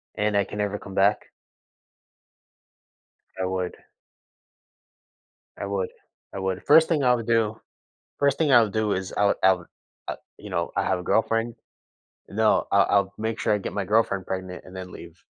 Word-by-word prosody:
And 105 0 0
I 100 - +4
can 105 - -8
never 105 0 -1
come 95 - -10
back? 100 +2 +3 2.2
I 95 - 0
would. 95 -1 -3 1.8
I - - -4
would. 100 -2 -2 0.4
I - - -5
would. 95 -1 -2
1st 160 +2 +7
thing 155 -4 +1
I 125 -1 +5
would 115 -2 -2
do 110 -2 +1 0.6
1st 140 -1 +2
thing 155 -3 +2
I 120 -2 +8
would 105 -3 -1
do 110 -1 +1
is 95 0 -4
I 105 - +3
would 100 - +3
I 95 0 +7
would, 90 -2 -9 0.4
uh, - - -3 0.2
you 105 - -10
know, 85 -2 -2
I - - +1
have 90 - 0
a - - -7
girlfriend 115 +3 +1 0.7
No, 110 +2 +2
I 100 - +5
I'll 100 0 +2
make 110 +1 -2
sure - - +1
I - - +1
get 100 - -5
my 100 -2 -2
girlfriend 100 -2 +1
pregnant 95 -1 -5
and 90 - -13
then 90 -1 -7
leave. 85 0 -12
100 Hz, 185 wpm, -25 LUFS, 95-110 Hz, 2.2 s, I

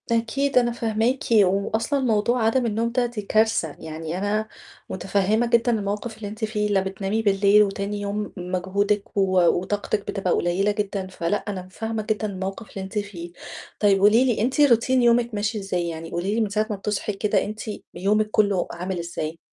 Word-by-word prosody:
أكيد 255 +4 +1
أنا 240 -1 +4
فاهماكِ 230 +2 0
و 215 -3 +6 0.2
وأصلًا 230 +6 0
موضوع 235 -1 +1
عَدَم 240 +3 +2
النوم 230 +1 0
ده 245 0 +1
دي 240 -3 -4
كارثة. 215 -6 +1
يعني 160 +1 -5
أنا 210 +3 -1 0.4
مُتفهِّمة 200 +4 +1
جدًا 235 0 +3
الموقِف 210 +1 -2
اللي 215 -2 -6
أنتِ 215 +2 -3
فيه 210 -1 -1
لا 195 -2 +3
بتنامي 195 +3 -2
بالليل 200 0 +5
وتاني 200 +1 -3
يوم 205 +1 -3
مجهودِك 190 +4 -1
و 190 -2 +3
وطاقتِك 200 +4 0
بتبقى 200 -3 -1
قُليّلة 185 +4 +1
جدًا 205 -2 -3
فلأ، 185 +1 -1
أنا 185 -3 -4
فاهمة 225 +1 -3
جدًا 215 0 0
الموقِف 195 +3 -5
اللي 195 - -6
أنتِ 190 +3 -6
فيه. 175 -4 -7 0.5
طيب 200 -2 +4
قولي 215 +6 +5
لي 240 -5 +1
أنتِ 260 +6 +1
routine 240 -4 +4
يومِك 240 -2 +3
ماشي 205 +1 -1
إزاي؟ 180 -3 -2
يعني 165 0 -7
قولي 185 +5 -1
لي 230 - +1
من 215 - 0
ساعة 215 +2 0
ما 210 - -1
بتصحي 210 +1 -2
كده 205 +1 +1
أنتِ 215 +1 -6 0.3
يومِك 215 +3 +1
كلّه 200 -4 +2
عامل 180 +1 -4
إزاي؟ 165 -1 -4
205 Hz, 180 wpm, -24 LUFS, 195-225 Hz, 0.5 s, و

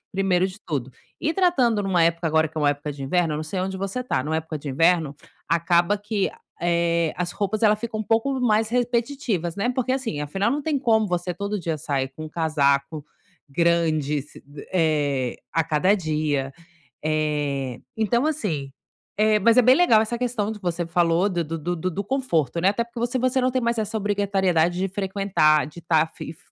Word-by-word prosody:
primeiro 190 -1 +2
de 190 +2 -9
tudo. 135 -4 -3 0.3
E 315 - 0
tratando 260 - +2
numa 185 -3 +2
época 170 0 +1
agora, 160 0 +2
que 160 - -26
é - - -1
uma 145 -1 +4
época 145 +1 -4
de 140 -1 -9
inverno, 160 +1 0
não 155 - -3
sei 185 +4 -3
onde 190 0 -3
você 195 +6 -3
tá, 250 - -1
numa 160 +1 -1
época 160 -1 -4
de 140 - -7
inverno, 165 0 +2 0.3
acaba 170 +4 +2
que, 205 -1 -2 0.3
eh, 170 -1 +1
as 175 0 -2
roupas, 205 +3 -2
elas 210 -1 +4
ficam 220 -1 -4
um - - -1
pouco 240 +5 0
mais 220 -2 +2
repetitivas, 235 - -1
né. 220 +5 0
Porque 255 0 -1
assim, 230 - -2
afinal, 195 +9 -1
não 290 +3 0
tem 290 -3 -1
como 220 -4 +3
você 180 0 -2
todo 200 +2 -3
dia 165 -3 -2
sair 135 -2 -2
com 155 +4 -9
um - - -6
casaco 150 -2 0 0.4
grande 155 -2 +1
si 145 - -16 0.3
eh, 145 -7 +1 0.2
a 165 +1 +2
cada 165 +5 +2
dia. 150 -6 -1 0.5
Eh, 145 -4 -1 0.2
então 235 +5 +1
assim, 165 - -2 0.5
eh, 215 0 +4
mas 230 +4 +4
é - - +7
bem 255 +3 +6
legal 235 -12 +5
essa 235 +2 -3
questão 230 -4 -1
do 210 - -8
que - - -34
você 175 -1 -1
falou 170 +2 +2
do 175 -2 -1
do 165 +1 -4
do 175 +3 -3
do 185 +3 -2
do 200 +4 -4
conforto, 170 - 0
né. 185 - +4
Até 235 +3 -1
porque, 235 0 -3
se 255 - -2
você 255 +1 +1
não 255 - +2
tem 255 0 0
mais 235 0 0
essa 220 0 -2
obrigatoriedade 190 -4 +1
de 195 +1 0
frequentar, 190 -6 +2
de 155 +3 -11
tá 160 -1 +3
fif 160 0 -10
180 Hz, 200 wpm, -24 LUFS, 155-220 Hz, 0.5 s, é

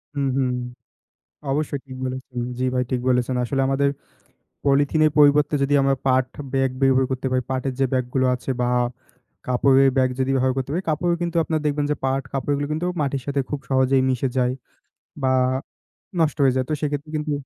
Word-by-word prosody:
হুম, 140 -1 0
হুম। 130 -2 +1 1.0
অবশ্যই 145 -1 -1
ঠিক 130 -1 -9
বলেছেন। 130 -1 -5 0.2
জি 130 - -1
ভাই, 125 0 +1
ঠিক 125 - 0
বলেছেন। 125 0 +1
আসলে 135 +2 0
আমাদের 140 +1 +2 0.8
পলিথিনের 145 +2 +3
পরিবর্তে 145 0 +5
যদি 140 +1 +1
আমরা 135 0 +2
পাট 130 0 +3 0.3
ব্যাগ 135 -1 +2
ব্যবহার 135 -1 +4
করতে 130 0 -2
পারি, 130 0 +2
পাটের 130 0 -1
যে 135 - +4
ব্যাগগুলো 130 +1 0
আছে 125 - -8
বা 120 - +1 0.8
কাপড়ের 135 +2 +4
ব্যাগ 130 -1 +3
যদি 130 +1 +1
ব্যবহার 130 0 +2
করতে 135 0 -2
পারি, 185 +3 -1
কাপড়ও 170 +3 +1
কিন্তু 170 0 -2
আপনার 160 -1 -1
দেখবেন 145 0 0
যে - - +1
পাট 135 0 0
কাপড়গুলো 145 +2 -1
কিন্তু 165 +3 -2 0.2
মাটির 140 -2 -1
সাথে 140 -1 0
খুব 145 - -3
সহজেই 130 0 +3
মিশে 130 +1 0
যায় 125 0 +2 0.7
বা 130 0 +2 0.9
নষ্ট 155 -2 +2
হয়ে 130 -1 +4
যায়। 130 - +1
তো - - +2
সেক্ষেত্রে 145 +1 -2
কিন্তু 150 0 -2
135 Hz, 180 wpm, -23 LUFS, 130-145 Hz, 1.0 s, পরিবর্তে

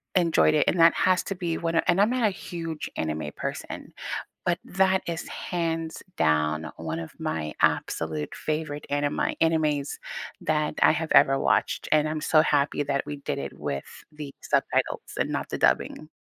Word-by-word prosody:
enjoyed 165 -3 +4
it. 150 - +3
And 175 - +2
that 165 0 +7
has 185 0 +3
to 195 - -3
be 175 -3 -2
what 165 0 -2
and 175 +3 +4
I'm 210 - +4
not 250 -1 0
a 205 - 0
huge 165 -4 -5
anime 80 -1 -2
person, - - -5 0.5
but 175 -1 +2
that 190 0 +2
is 170 0 -3
hands 165 -2 -3 0.2
down 80 0 +1
one 80 0 -4
of 80 - -8
my 75 -1 -3
absolute 80 -2 0
favorite 155 -1 -3
animi 145 0 0
animes 155 -3 +1 0.4
that 150 -1 0
I - - +7
have 160 0 -2
ever 135 0 +6
watched, - - +1
and 155 0 +4
I'm 155 - -2
so 155 0 +5
happy 145 -1 +1
that 140 -1 -1
we 145 - -5
did 140 0 -3
it - - -6
with 70 -2 -3 0.3
the 150 -2 -8
subtitles - - 0
and - - 0
not - - -3
the - - -3
dubbing. 155 - +1
155 Hz, 175 wpm, -26 LUFS, 135-165 Hz, 0.5 s, that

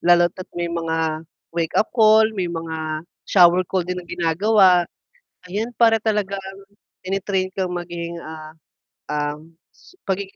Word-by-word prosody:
lalo 175 0 +5
at 185 - -9
may 175 0 -1
mga 160 -1 -1 0.3
wake-up 165 +5 0
call, 220 -1 +5
may 185 -4 -2
mga 160 -2 -4 0.2
shower 180 -1 +6
call 185 -2 0
din 180 +1 -3
na 175 - -16
ginagawa, 180 +1 +3 0.6
ayan 215 +6 -3
para 230 -1 +5
talagang 205 -2 -1 0.6
tine-train 190 0 -1
kang 185 -2 -1
maging, 170 -1 -5
ah, 155 -1 -9 0.6
ah, 150 0 -2 0.3
s - - -21
pagigi 195 0 -3
175 Hz, 135 wpm, -21 LUFS, 165-195 Hz, 0.6 s, shower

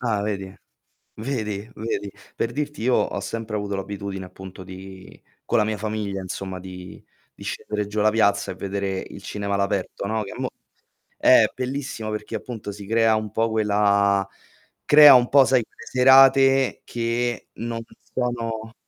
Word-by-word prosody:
Ah, 115 -4 0
vedi? 100 -2 -4 0.6
Vedi, 110 -3 -4
vedi. 105 -2 -3 0.3
Per 115 - -1
dirti, 150 0 -4
io 125 +1 +3
ho - - 0
sempre 115 -1 -5
avuto 100 -1 -2
l'abitudine 95 0 -5
appunto 95 0 -11
di 95 0 -12 0.2
con - - 0
la 105 - +3
mia 110 -1 -2
famiglia 105 -2 -3
insomma, 95 0 -5
di 90 0 -10 0.3
di - - -11
scendere 105 -1 -3
giù 105 +1 -4
alla 105 +1 +4
piazza 100 -3 +2
e - - -7
vedere 95 0 -3
il 100 - -10
cinema 100 0 -3
all'aperto, 100 0 -2
no, 110 +1 -1
che 100 - -8
mo - - -2 0.7
eh, - - +6
bellissimo 130 -4 -4
perché 105 0 -5
appunto 110 -4 -7
si 100 0 -10
crea 115 +1 +3
un 110 -1 -3
po' 115 +1 +1
quella 100 -2 +2 0.6
crea 150 -1 +9
un 125 -1 +5
po', 140 -1 +7
sai, 130 -3 +3
quelle 115 - -15
serate 135 +1 +5
che 120 0 -2
non 115 0 -4 0.3
sono 115 -3 -3
105 Hz, 160 wpm, -23 LUFS, 100-115 Hz, 0.7 s, crea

